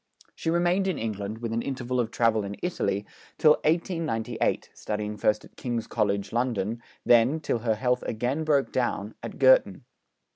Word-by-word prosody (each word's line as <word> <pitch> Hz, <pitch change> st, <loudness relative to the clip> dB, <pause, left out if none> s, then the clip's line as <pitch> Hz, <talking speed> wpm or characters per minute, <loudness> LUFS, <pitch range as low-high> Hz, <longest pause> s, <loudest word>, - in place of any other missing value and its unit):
She -, -, -3 dB
remained 175 Hz, +3 st, +2 dB
in 185 Hz, -, 0 dB
England, 105 Hz, -1 st, -4 dB
with 115 Hz, -1 st, -2 dB
an 115 Hz, -, 0 dB
interval 125 Hz, -1 st, -2 dB
of 115 Hz, -2 st, 0 dB
travel 115 Hz, -2 st, +2 dB
in 100 Hz, 0 st, -5 dB
Italy, 105 Hz, -, -1 dB, 0.3 s
till 155 Hz, -, +6 dB
1898, 160 Hz, -8 st, 0 dB
studying 105 Hz, 0 st, -4 dB
first 105 Hz, +1 st, +1 dB
at -, -, -19 dB
King's 120 Hz, -3 st, -3 dB
College, 100 Hz, -3 st, -1 dB
London, 115 Hz, -2 st, -1 dB, 0.2 s
then, 120 Hz, +6 st, +5 dB
till 125 Hz, -, -1 dB
her 110 Hz, -1 st, 0 dB
health 125 Hz, +2 st, 0 dB
again 125 Hz, +7 st, -1 dB
broke 145 Hz, -3 st, +2 dB
down, 110 Hz, -4 st, -1 dB
at -, -, -7 dB
Girton. -, -, +4 dB
120 Hz, 160 wpm, -27 LUFS, 110-150 Hz, 0.3 s, till